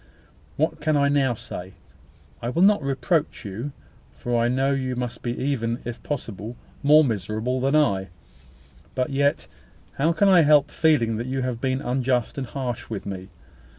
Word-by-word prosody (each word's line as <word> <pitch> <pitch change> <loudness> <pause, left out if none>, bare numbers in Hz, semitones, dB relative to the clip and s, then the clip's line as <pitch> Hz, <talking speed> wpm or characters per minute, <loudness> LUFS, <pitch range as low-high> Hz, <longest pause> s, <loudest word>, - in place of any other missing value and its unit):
What - - 0
can 155 -1 +2
I 140 0 +3
now 135 -4 +2
say? 95 -3 -8 0.7
I 120 - -2
will 165 +8 +2
not 205 -3 +5
reproach 140 +1 -1
you, 110 +9 -5 0.4
for 120 0 -3
I - - +3
know 135 +3 +1
you 130 -2 -1
must 120 -1 -4
be 120 0 -3
even, 120 -4 -1
if 120 -1 -6
possible, 115 -5 -5 0.3
more 150 +2 +6
miserable 110 +2 -1
than 135 +3 +2
I: 100 -11 +2 0.9
but 130 +2 -1
yet, 140 +1 +1 0.5
how 155 +4 +3
can 200 +4 +3
I 185 -3 +7
help 150 -1 +5
feeling 125 -9 +2
that 120 +3 -4
you 130 0 -2
have 125 -2 -3
been 130 0 0
unjust 125 0 0
and 130 - -4
harsh 125 -3 -4
with 110 -4 -5
me? 95 -1 -6
130 Hz, 170 wpm, -24 LUFS, 115-145 Hz, 0.9 s, I